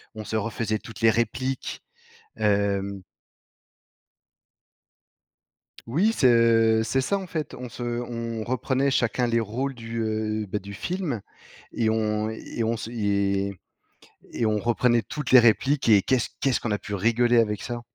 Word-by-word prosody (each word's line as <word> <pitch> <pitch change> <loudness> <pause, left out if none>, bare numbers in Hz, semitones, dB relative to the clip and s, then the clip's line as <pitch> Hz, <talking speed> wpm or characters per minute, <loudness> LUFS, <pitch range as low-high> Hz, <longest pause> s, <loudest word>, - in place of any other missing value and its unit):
on 110 - -6
se 110 - -4
refaisait 110 0 -1
toutes 115 - -11
les 115 - +6
répliques, 120 +4 -2 0.5
hem 100 -1 0 2.9
Oui, 190 - +2
c'est, - - +2
heu, 115 -1 +4
c'est 130 +4 0
ça, 200 +9 0
en 190 - -7
fait. 155 -4 -4
On 125 -1 -7
se 120 +1 -7
on 115 -2 -3
reprenait 130 +3 0
chacun 125 -2 +1
les 115 0 +2
rôles 125 +5 -3
du, 115 -1 -6
heu, 110 -1 -2
bah, 100 +2 -2
du 100 +1 -8
film 160 - -3 0.5
et 110 -2 0
on 110 -1 0
et 110 +1 -5
on 115 +1 0
se 110 - -6
et 100 -3 0 0.8
et 115 - 0
on 105 -1 +2
reprenait 120 +1 +2
toutes 150 -5 -5
les 130 - +10
répliques 120 +4 +3
et 105 -3 +6
qu'est-ce 125 +3 +1
qu'est-ce 135 -3 +2
qu'on 115 - -3
a 105 - +1
pu 105 - -5
rigoler 120 +4 +2
avec 105 -3 0
ça. 120 -1 -5
115 Hz, 155 wpm, -25 LUFS, 110-125 Hz, 2.9 s, les